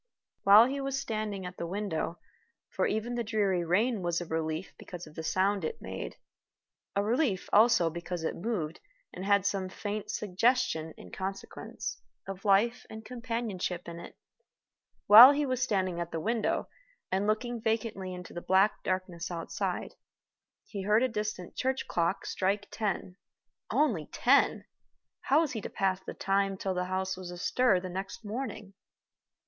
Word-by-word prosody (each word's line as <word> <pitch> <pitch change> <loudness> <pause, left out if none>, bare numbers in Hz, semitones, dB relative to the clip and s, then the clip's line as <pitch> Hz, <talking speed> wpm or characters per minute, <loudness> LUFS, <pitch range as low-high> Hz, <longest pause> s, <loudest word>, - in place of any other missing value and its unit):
While 205 +3 +9
he 275 +2 -2
was 275 0 -2
still 275 - -7
standing 210 -3 -3
at 180 0 -7
the 170 - -4
window 180 -3 -3 0.5
for - - +1
even 220 +3 -2
the 240 -1 -1
dreary 205 -5 +1
rain 210 +6 +1
was 175 -1 0
a 175 - -5
relief, 160 +1 -3
because 180 -1 -8
of 155 - -14
the 160 - -6
sound 190 +4 +1
it 155 - -3
made; 95 -11 -6 0.8
a 200 - +2
relief, 225 -3 +1
also, 210 -6 +5
because 170 0 -5
it - - -1
moved, 175 -6 -3 0.3
and 185 - -6
had 200 -1 +3
some 195 -2 -1
faint 205 +2 -5
suggestion, 205 -5 +1
in - - -12
consequence, 195 +1 -6 0.3
of 195 +1 -7
life 210 +5 +3
and 220 0 -9
companionship 230 -8 -3
in 170 0 -7
it - - -11 0.9
while 235 +7 +11
he 290 +1 0
was 255 -2 -1
standing 185 -8 0
at 170 0 -4
the 165 - -2
window, 225 +5 0 0.4
and 195 +2 +1
looking 235 +2 -1
vacantly 220 -4 -1
into 180 -1 -8
the 175 - -5
black 190 +4 +3
darkness 185 -1 -3
outside, 170 -2 -3 0.7
he 200 - -6
heard 210 +4 +3
a - - +4
distant 210 -5 -4
church 260 +1 -1
clock 170 +3 0
strike 200 +2 -1
ten. 195 -3 -3 0.5
Only 215 - +1
ten! 275 +3 +3 0.5
How 290 +4 +3
was 315 -4 -1
he 225 - -4
to - - -6
pass 190 -1 0
the - - -7
time 195 0 0
till 190 0 -2
the 180 0 -1
house 185 0 -2
was 185 -1 -8
astir 190 +4 +2
the 185 - -6
next 190 +4 -6
morning? 215 -3 -5
195 Hz, 165 wpm, -30 LUFS, 180-225 Hz, 0.9 s, while